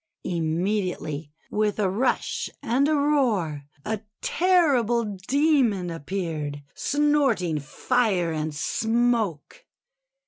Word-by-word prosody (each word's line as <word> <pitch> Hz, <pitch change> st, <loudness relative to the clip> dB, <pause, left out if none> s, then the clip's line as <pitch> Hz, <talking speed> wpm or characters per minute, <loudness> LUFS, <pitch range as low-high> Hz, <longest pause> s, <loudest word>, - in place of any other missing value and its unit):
Immediately, 170 Hz, -3 st, -2 dB, 0.2 s
with 210 Hz, -1 st, 0 dB
a 210 Hz, -2 st, +2 dB
rush 210 Hz, +8 st, 0 dB
and 265 Hz, +5 st, +2 dB
a 310 Hz, -, +2 dB
roar, 230 Hz, -, +1 dB, 0.2 s
a 220 Hz, -2 st, -2 dB, 0.2 s
terri 340 Hz, -8 st, +3 dB
ble 235 Hz, +1 st, +1 dB, 0.2 s
Demon 260 Hz, -, +2 dB
appeared, 155 Hz, -3 st, -4 dB
snorting 275 Hz, -, +1 dB
fire 185 Hz, -, 0 dB
and 155 Hz, -1 st, -3 dB
smoke. 225 Hz, -2 st, 0 dB
210 Hz, 95 wpm, -25 LUFS, 165-255 Hz, 0.2 s, terri